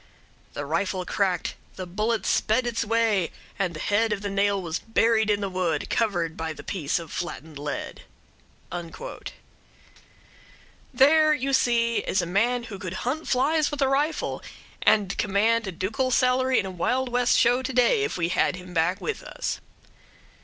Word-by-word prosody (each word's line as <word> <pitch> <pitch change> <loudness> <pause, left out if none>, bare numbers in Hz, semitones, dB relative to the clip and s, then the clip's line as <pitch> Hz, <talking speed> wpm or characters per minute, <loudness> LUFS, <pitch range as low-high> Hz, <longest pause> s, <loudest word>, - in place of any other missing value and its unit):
"The 145 - -4
rifle 180 +4 -1
cracked, 185 -4 0 0.2
the 185 - -5
bullet 215 +6 -1
sped 230 +4 +2
its 235 -1 -1
way, 225 -5 +1 0.3
and 180 -4 -1
the - - -6
head 215 +5 +1
of 205 -1 -2
the 200 - -2
nail 200 0 +2
was 170 -2 -3
buried 225 -1 +2
in 205 -1 +2
the 200 - -1
wood, 180 -5 -1
covered 175 -8 0
by 160 -1 -3
the - - -11
piece 155 -7 -1
of 165 -3 -7
flattened 160 -4 -6
lead." 145 0 -5 2.9
There, 305 +2 +5
you 275 -1 -2
see, 235 -2 +2
is - - 0
a - - +1
man 235 +8 +1
who 210 -5 -8
could 185 -1 -5
hunt 295 +6 -2
flies 290 +4 +2
with 290 -2 -1
a - - +3
rifle, 290 +4 0 0.4
and 205 -3 +3
command 210 +2 +2
a - - -2
ducal 215 +9 -1
salary 255 0 +3
in - - +1
a 190 - -4
Wild 250 +9 0
West 245 0 +3
show 245 +2 +4
to 260 - -3
day 260 - +3
if 430 - -2
we 170 -1 0
had 185 - +1
him 180 0 -10
back 175 +4 +1
with 450 - -3
us. - - -4
210 Hz, 170 wpm, -25 LUFS, 180-250 Hz, 2.9 s, There